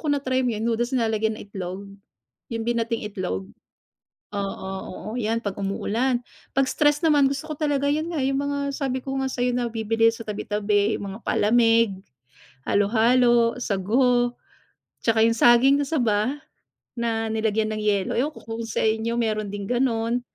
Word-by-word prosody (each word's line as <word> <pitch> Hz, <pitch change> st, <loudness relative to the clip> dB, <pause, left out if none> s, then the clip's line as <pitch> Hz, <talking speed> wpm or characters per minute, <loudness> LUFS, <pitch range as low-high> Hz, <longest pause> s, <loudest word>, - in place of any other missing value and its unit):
kung 290 Hz, -, +3 dB
na-try 260 Hz, -2 st, 0 dB
mo 255 Hz, -, 0 dB
yun 215 Hz, -, -3 dB
yung 235 Hz, -, +1 dB
noodles, 240 Hz, +3 st, -1 dB
nilalagyan 220 Hz, -2 st, 0 dB
ng -, -, -9 dB
itlog, 190 Hz, -1 st, -6 dB, 0.6 s
yung 230 Hz, -1 st, -3 dB
binating 230 Hz, -1 st, -1 dB
itlog? 185 Hz, -, -3 dB, 0.9 s
Oo, 195 Hz, -1 st, -4 dB, 0.2 s
oo, 195 Hz, -, -8 dB
'yan 225 Hz, +1 st, 0 dB
pag 205 Hz, -4 st, -3 dB
umuulan. 235 Hz, +6 st, -1 dB, 0.3 s
Pag 270 Hz, -, +5 dB
stress 295 Hz, +3 st, +2 dB
naman, 290 Hz, -3 st, +5 dB
gusto 280 Hz, +3 st, -4 dB
ko 310 Hz, -, -5 dB
talaga 290 Hz, -2 st, 0 dB
yun 310 Hz, +2 st, -2 dB
nga, 305 Hz, -6 st, -1 dB
yung 270 Hz, +1 st, 0 dB
mga 285 Hz, 0 st, -2 dB
sabi 260 Hz, -2 st, -3 dB
ko 270 Hz, -, -3 dB
nga 265 Hz, -, -1 dB
sa'yo, 245 Hz, -1 st, -1 dB
nabibili 225 Hz, -2 st, +1 dB
sa 230 Hz, 0 st, -7 dB
tabi-tabi, 210 Hz, 0 st, 0 dB
yung 200 Hz, -1 st, -6 dB
mga 210 Hz, -, -9 dB
palamig, 230 Hz, -1 st, +3 dB, 0.8 s
halo-halo, 235 Hz, +3 st, +3 dB
sago, 245 Hz, +3 st, +1 dB, 0.7 s
'tsaka 225 Hz, -1 st, +3 dB
yung 230 Hz, +1 st, +3 dB
saging 240 Hz, +4 st, +6 dB
na 285 Hz, -, 0 dB
saba 255 Hz, -1 st, 0 dB, 0.5 s
na 225 Hz, -2 st, -2 dB
nilagyan 220 Hz, 0 st, 0 dB
ng 215 Hz, -, -3 dB
yelo, 205 Hz, -2 st, 0 dB
ewan 260 Hz, +5 st, +1 dB
ko -, -, -12 dB
kung 225 Hz, 0 st, -5 dB
sa -, -, -1 dB
inyo 220 Hz, +1 st, 0 dB
meron 215 Hz, -3 st, -1 dB
ding 200 Hz, 0 st, -5 dB
ganon. 240 Hz, 0 st, 0 dB
230 Hz, 165 wpm, -24 LUFS, 215-255 Hz, 0.9 s, saging